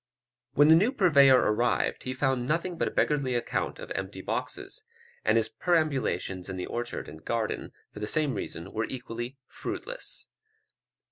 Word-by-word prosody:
When 145 Hz, +2 st, +7 dB
the 160 Hz, -, +9 dB
new 205 Hz, +9 st, +4 dB
purveyor 140 Hz, -, +6 dB
arrived, 115 Hz, 0 st, +1 dB
he 130 Hz, -, -2 dB
found 130 Hz, -2 st, +1 dB
nothing 170 Hz, +4 st, 0 dB
but -, -, 0 dB
"a -, -, -2 dB
beggarly 140 Hz, -4 st, +1 dB
account 120 Hz, -, -1 dB
of -, -, -9 dB
empty 95 Hz, 0 st, -4 dB
boxes;" -, -, -4 dB, 0.4 s
and 110 Hz, +1 st, +4 dB
his 115 Hz, -1 st, +2 dB
perambulations 120 Hz, -, 0 dB
in 95 Hz, -, -4 dB
the 90 Hz, -, -3 dB
orchard 120 Hz, 0 st, -4 dB
and 80 Hz, +1 st, -11 dB
garden, 115 Hz, -2 st, -2 dB, 0.2 s
for -, -, -9 dB
the 105 Hz, -, -3 dB
same 150 Hz, -1 st, +2 dB
reason 95 Hz, -3 st, -5 dB
were 110 Hz, +1 st, 0 dB
equally 120 Hz, 0 st, -6 dB
fruitless. -, -, -5 dB
125 Hz, 160 wpm, -28 LUFS, 105-150 Hz, 0.4 s, the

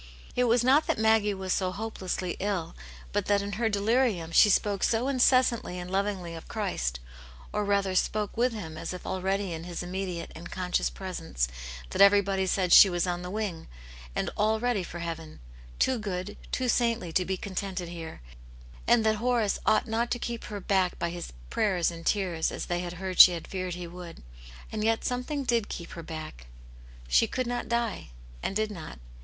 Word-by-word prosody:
It 250 Hz, -, +3 dB
was 235 Hz, 0 st, +3 dB
not 275 Hz, +5 st, +4 dB
that -, -, +1 dB
Maggie 220 Hz, -2 st, +3 dB
was 190 Hz, -1 st, -2 dB
so 185 Hz, -1 st, 0 dB
hopelessly 185 Hz, -4 st, -3 dB
ill, 195 Hz, -4 st, -2 dB, 0.4 s
but -, -, 0 dB
that 200 Hz, -1 st, +3 dB
in 200 Hz, -, -4 dB
her 220 Hz, +3 st, 0 dB
delirium 205 Hz, -4 st, +1 dB
she 210 Hz, -, +7 dB
spoke 200 Hz, 0 st, +2 dB
so 230 Hz, +3 st, +2 dB
incessantly 255 Hz, -7 st, +3 dB
and 180 Hz, 0 st, -6 dB
lovingly 190 Hz, -3 st, -1 dB
of 165 Hz, -, -9 dB
Christ, -, -, -2 dB, 0.5 s
or 210 Hz, -, 0 dB
rather 200 Hz, -2 st, +1 dB
spoke 210 Hz, +2 st, 0 dB
with 245 Hz, +2 st, +2 dB
Him 170 Hz, -8 st, -7 dB
a^ -, -, -4 dB
if 180 Hz, -, -10 dB
already 190 Hz, 0 st, -1 dB
in 165 Hz, +1 st, -6 dB
His 175 Hz, 0 st, -5 dB
immediate 180 Hz, -1 st, -4 dB
and 170 Hz, +2 st, -9 dB
conscious 180 Hz, -, 0 dB
presence^ -, -, -3 dB, 0.5 s
that -, -, 0 dB
everybody 200 Hz, -1 st, +5 dB
said 185 Hz, -1 st, +2 dB
she 195 Hz, -, +10 dB
was 175 Hz, 0 st, 0 dB
on 175 Hz, -1 st, -2 dB
the 180 Hz, -, -6 dB
wing, 195 Hz, -5 st, -3 dB, 0.5 s
and -, -, -1 dB
all 220 Hz, +1 st, +2 dB
ready 245 Hz, -3 st, +1 dB
for 175 Hz, -1 st, -7 dB
heaven, 165 Hz, -2 st, -6 dB, 0.4 s
too 260 Hz, -2 st, +2 dB
good, 195 Hz, -1 st, -4 dB, 0.2 s
too 255 Hz, -, 0 dB
saintly 230 Hz, -8 st, +1 dB
to 185 Hz, -, +3 dB
be 190 Hz, +1 st, -2 dB
contented 190 Hz, -2 st, -4 dB
here, 165 Hz, -, -8 dB, 0.7 s
and 225 Hz, -2 st, +4 dB
that 215 Hz, 0 st, +3 dB
Horace 235 Hz, -2 st, +1 dB
ought 215 Hz, -, +3 dB
not 230 Hz, +2 st, 0 dB
to -, -, 0 dB
keep 235 Hz, -1 st, -5 dB
her 205 Hz, -1 st, -5 dB
back 190 Hz, -2 st, +1 dB
by 170 Hz, -, -2 dB
his 175 Hz, 0 st, -6 dB, 0.2 s
prayers 185 Hz, -5 st, +1 dB
and 165 Hz, 0 st, -9 dB
tears, 180 Hz, -4 st, 0 dB
as -, -, -4 dB
they 175 Hz, 0 st, -1 dB
had 175 Hz, -1 st, -4 dB
heard 185 Hz, 0 st, -5 dB
she 180 Hz, -, +11 dB
had 170 Hz, -, -6 dB
feared 185 Hz, -2 st, -3 dB
he 180 Hz, 0 st, -6 dB
would. 170 Hz, -, -10 dB, 0.5 s
And 215 Hz, -1 st, -2 dB
yet 225 Hz, 0 st, +1 dB
something 250 Hz, +3 st, -2 dB
did 235 Hz, -4 st, +1 dB
keep 170 Hz, -, -6 dB
her 170 Hz, -, -7 dB
back; 155 Hz, -, -8 dB, 0.6 s
"she -, -, +4 dB
could 255 Hz, -, -2 dB
not 240 Hz, 0 st, -3 dB
die,'* 235 Hz, -, -1 dB, 0.3 s
«nd 195 Hz, -, -1 dB
^v^ 215 Hz, 0 st, 0 dB
uo\. 160 Hz, -, -8 dB
195 Hz, 195 wpm, -28 LUFS, 175-220 Hz, 0.7 s, she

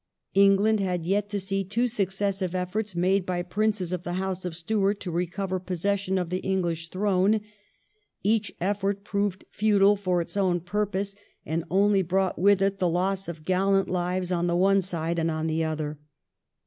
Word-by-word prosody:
England 200 Hz, +2 st, +4 dB
had 180 Hz, -4 st, -1 dB
yet 205 Hz, +3 st, 0 dB
to 205 Hz, -1 st, -2 dB
see 195 Hz, +1 st, -1 dB
two 215 Hz, +6 st, 0 dB
successive 195 Hz, -4 st, -1 dB
efforts 185 Hz, +2 st, -2 dB
made 185 Hz, +3 st, +2 dB
by 180 Hz, -1 st, -2 dB
Princes 195 Hz, -1 st, -1 dB
of 180 Hz, -, -2 dB
the 175 Hz, -1 st, -4 dB
House 185 Hz, 0 st, -3 dB
of 175 Hz, -2 st, -4 dB
Stuart 200 Hz, +3 st, 0 dB
to 180 Hz, -, -4 dB
recover 185 Hz, +2 st, -2 dB
possession 190 Hz, +2 st, -1 dB
of 180 Hz, -2 st, -2 dB
the 185 Hz, -, 0 dB
English 170 Hz, -4 st, -1 dB
throne. 200 Hz, +2 st, +2 dB, 0.8 s
Each 215 Hz, +1 st, +1 dB
effort 200 Hz, +1 st, -1 dB
proved 200 Hz, -2 st, -2 dB
futile 205 Hz, -1 st, +4 dB
for 185 Hz, -3 st, 0 dB
its 170 Hz, +1 st, -4 dB
own 185 Hz, -3 st, +1 dB
purpose, 200 Hz, +2 st, -2 dB, 0.3 s
and 160 Hz, +1 st, -2 dB
only 195 Hz, +2 st, +3 dB
brought 190 Hz, +1 st, 0 dB
with 195 Hz, +1 st, +4 dB
it 195 Hz, 0 st, 0 dB
the 180 Hz, -2 st, +2 dB
loss 190 Hz, +3 st, 0 dB
of 155 Hz, -2 st, -7 dB
gallant 195 Hz, +1 st, +2 dB
lives 180 Hz, 0 st, -1 dB
on 175 Hz, -1 st, +1 dB
the 170 Hz, -, +1 dB
one 195 Hz, +2 st, +4 dB
side 170 Hz, -2 st, -2 dB
and 165 Hz, 0 st, +1 dB
on 160 Hz, 0 st, -2 dB
the 160 Hz, 0 st, 0 dB
other. 155 Hz, -2 st, -3 dB
190 Hz, 175 wpm, -26 LUFS, 175-200 Hz, 0.8 s, England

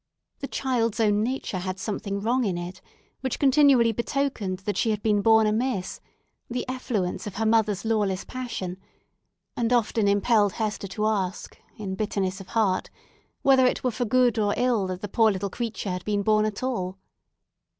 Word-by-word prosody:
The 275 Hz, -, -4 dB
child's 235 Hz, -6 st, -1 dB
own 210 Hz, -2 st, +3 dB
nature 235 Hz, -5 st, -2 dB
had 185 Hz, +1 st, -4 dB
something 200 Hz, 0 st, -3 dB
wrong 245 Hz, +4 st, +1 dB
in 190 Hz, -6 st, -1 dB
it 175 Hz, +1 st, -7 dB, 0.4 s
which 260 Hz, -2 st, -2 dB
continually 270 Hz, -4 st, +5 dB
betokened 235 Hz, -5 st, -2 dB
that 205 Hz, -, -1 dB
she 225 Hz, -, +1 dB
had 210 Hz, -1 st, -1 dB
been 210 Hz, -2 st, +2 dB
born 220 Hz, +1 st, +5 dB
amiss—the 235 Hz, +2 st, -4 dB
effluence 235 Hz, -8 st, -2 dB
of 200 Hz, -, -7 dB
her 225 Hz, -, -1 dB
mother's 220 Hz, -2 st, +2 dB
lawless 205 Hz, -4 st, 0 dB
passion—and 230 Hz, 0 st, -7 dB
often 225 Hz, -3 st, +2 dB
impelled 205 Hz, 0 st, +3 dB
Hester 215 Hz, -3 st, -3 dB
to 210 Hz, +3 st, -2 dB
ask, 195 Hz, -4 st, -2 dB, 0.2 s
in 200 Hz, -3 st, -4 dB
bitterness 195 Hz, -1 st, -2 dB
of 190 Hz, -, -12 dB
heart, 205 Hz, -5 st, 0 dB, 0.5 s
whether 265 Hz, -2 st, +5 dB
it -, -, -1 dB
were 250 Hz, -, +1 dB
for 245 Hz, +2 st, -2 dB
ill 245 Hz, 0 st, +3 dB
or 205 Hz, -1 st, +2 dB
good 240 Hz, -6 st, +1 dB
that 185 Hz, 0 st, -4 dB
the 205 Hz, -, -4 dB
poor 220 Hz, +2 st, +3 dB
little 195 Hz, 0 st, -3 dB
creature 225 Hz, -4 st, -3 dB
had 180 Hz, 0 st, -4 dB
been 205 Hz, -1 st, -1 dB
born 215 Hz, +1 st, +3 dB
at 215 Hz, +2 st, -4 dB
all. 190 Hz, -8 st, -2 dB
215 Hz, 170 wpm, -25 LUFS, 195-240 Hz, 0.5 s, continually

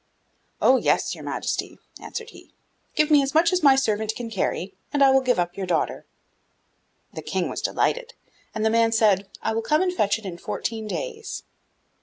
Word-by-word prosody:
'Oh, 260 Hz, -, +5 dB
yes, -, -, +1 dB
your -, -, -9 dB
Majesty,' -, -, -3 dB, 0.2 s
answered 455 Hz, 0 st, -7 dB
he, -, -, -15 dB, 0.5 s
'give 305 Hz, 0 st, +2 dB
me 295 Hz, -2 st, +7 dB
as 275 Hz, +2 st, -3 dB
much 335 Hz, +2 st, +4 dB
as 365 Hz, -, +2 dB
my 275 Hz, -2 st, +7 dB
servant 220 Hz, -4 st, 0 dB
can 235 Hz, -2 st, -6 dB
carry, 195 Hz, -2 st, -2 dB, 0.2 s
and 285 Hz, -1 st, +3 dB
I 270 Hz, -, +7 dB
will 265 Hz, 0 st, +5 dB
give 250 Hz, -1 st, +1 dB
up 175 Hz, 0 st, -1 dB
your 190 Hz, -1 st, -4 dB
daughter.' 170 Hz, -2 st, -1 dB, 1.1 s
The -, -, -6 dB
King -, -, -2 dB
was -, -, -4 dB
delighted, -, -, -1 dB, 0.4 s
and 215 Hz, 0 st, -1 dB
the 220 Hz, -, +3 dB
man 230 Hz, 0 st, +3 dB
said, 205 Hz, -3 st, +3 dB
'I -, -, 0 dB
will 225 Hz, -, 0 dB
come 305 Hz, +9 st, +2 dB
and 365 Hz, -1 st, 0 dB
fetch 205 Hz, -, +1 dB
it 220 Hz, -, -13 dB
in 175 Hz, -2 st, -6 dB
fourteen 220 Hz, +3 st, -4 dB
days. 450 Hz, -, -5 dB
230 Hz, 195 wpm, -24 LUFS, 210-305 Hz, 1.1 s, me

